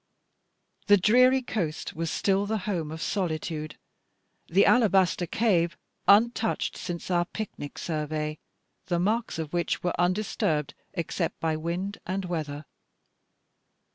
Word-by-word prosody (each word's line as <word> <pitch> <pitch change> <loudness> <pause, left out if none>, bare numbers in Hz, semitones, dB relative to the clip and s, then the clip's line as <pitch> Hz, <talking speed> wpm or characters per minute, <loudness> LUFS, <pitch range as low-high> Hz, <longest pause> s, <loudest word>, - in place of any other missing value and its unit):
The 205 -1 +7
dreary 255 +7 +5
coast 170 -10 -3
was 165 0 -2
still 195 +3 +1
the 220 +1 0
home 170 -7 -2
of 160 +2 -5
solitude, 155 -4 -2 0.7
the 190 +4 +4
alabaster 190 -6 +4
cave 175 -8 +1 0.3
untouched 225 +2 +3
since 175 0 -5
our 175 -1 +2
pic 215 +3 -5
nic 145 - -7
survey; 155 -1 -3 0.5
the 175 -1 +1
marks 215 +5 0
of 160 -1 -5
which 175 -2 -1
were 175 - 0
undisturbed 175 -5 0 0.2
except 170 0 -2
by 160 -1 0
wind 175 +6 -3
and 190 +1 -2
weather. 155 -4 -4
175 Hz, 125 wpm, -27 LUFS, 160-205 Hz, 0.7 s, The